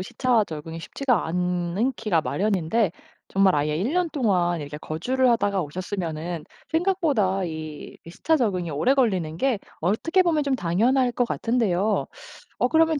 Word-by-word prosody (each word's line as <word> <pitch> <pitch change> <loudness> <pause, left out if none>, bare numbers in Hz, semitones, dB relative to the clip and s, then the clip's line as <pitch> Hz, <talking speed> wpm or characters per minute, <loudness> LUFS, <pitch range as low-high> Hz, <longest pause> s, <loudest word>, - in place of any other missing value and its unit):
시차와 235 +3 +1
적응이 160 -1 -7
쉽지가 250 +3 0
않기가 180 +3 0
마련인데 200 +2 +1 0.4
정말 195 -1 +3
아예 150 +1 0
1 195 +9 -1
년 360 -1 +1
동안 180 - +1
이렇게 145 +1 -7
거주를 250 +13 0
하다가 205 -4 +1
오셨으면은 170 0 -4 0.3
생각보다 315 - +1
이, 155 -2 -7
이 165 - -10
시차 320 - +1
적응이 185 -8 0
오래 155 - +2
걸리는 190 - +1
게 265 -3 +1 0.2
어떻게 275 - +2
보면 325 -4 +2
좀 280 -1 0
당연할 245 +6 +2
것 245 0 +1
같은데요. 220 -4 +1 0.5
어 245 - +3
그러면 320 -1 +3
200 Hz, 335 characters per minute, -24 LUFS, 170-255 Hz, 0.5 s, 정말